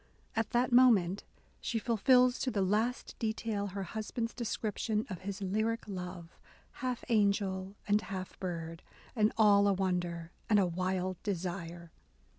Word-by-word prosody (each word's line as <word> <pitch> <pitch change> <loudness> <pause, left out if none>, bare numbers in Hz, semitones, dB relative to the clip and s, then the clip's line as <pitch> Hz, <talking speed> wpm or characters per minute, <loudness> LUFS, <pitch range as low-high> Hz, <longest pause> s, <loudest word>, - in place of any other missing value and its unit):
At 225 -1 0
that 245 +1 +1
moment 215 -7 +5 0.3
she 230 - -2
fulfils 250 +3 +4
to 260 - 0
the 205 -5 0
last 220 +6 0
detail 220 -2 -1
her 195 0 -4
husband's 220 +3 -4
description 220 -2 -2
of 180 - -5
his 200 +1 -5
"lyric 215 +4 -1
love, 180 -3 -7 0.4
half 255 -2 -2
angel 200 -3 +1
and 205 +1 +3
half 190 -3 -6
bird, 165 -2 -4 0.3
and 215 -2 +3
all 205 -2 +6
a 200 - +4
wonder 175 -3 -2 0.2
and 210 - +5
a 195 - +4
wild 185 +1 -2
desire." 175 -3 -4
200 Hz, 140 wpm, -32 LUFS, 185-225 Hz, 0.4 s, all